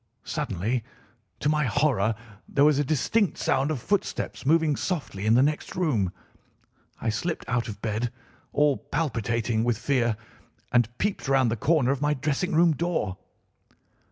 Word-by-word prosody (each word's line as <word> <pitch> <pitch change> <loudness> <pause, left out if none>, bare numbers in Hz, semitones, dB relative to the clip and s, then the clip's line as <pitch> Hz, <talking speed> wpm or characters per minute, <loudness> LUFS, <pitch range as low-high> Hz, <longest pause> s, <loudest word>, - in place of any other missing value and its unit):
Suddenly, 110 +7 -2 0.6
to - - 0
my 150 -1 +2
horror, 110 -3 +2 0.3
there 140 0 +4
was 150 -2 +4
a - - +3
distinct 160 - +1
sound 135 +2 +1
of 155 -5 -1
footsteps 200 - -2
moving 160 -1 +4
softly 135 - -3
in 110 - +5
the 125 - +6
next 150 +1 -1
room. 125 - +1 0.9
I - - -1
slipped 160 +9 -2
out 125 -2 0
of 105 -2 -8
bed, 115 +2 -1 0.4
all 145 -2 +3
palpitating 115 -6 -1
with 120 -2 +1
fear, 120 -4 +1 0.5
and 120 -2 +3
peeped 205 -7 -1
round 135 -3 +3
the - - +1
corner 140 +2 +2
of 140 -1 -2
my 150 0 +2
dressing 155 +7 -1
room 170 +1 +5
door. 155 - -1
135 Hz, 155 wpm, -26 LUFS, 115-155 Hz, 0.9 s, the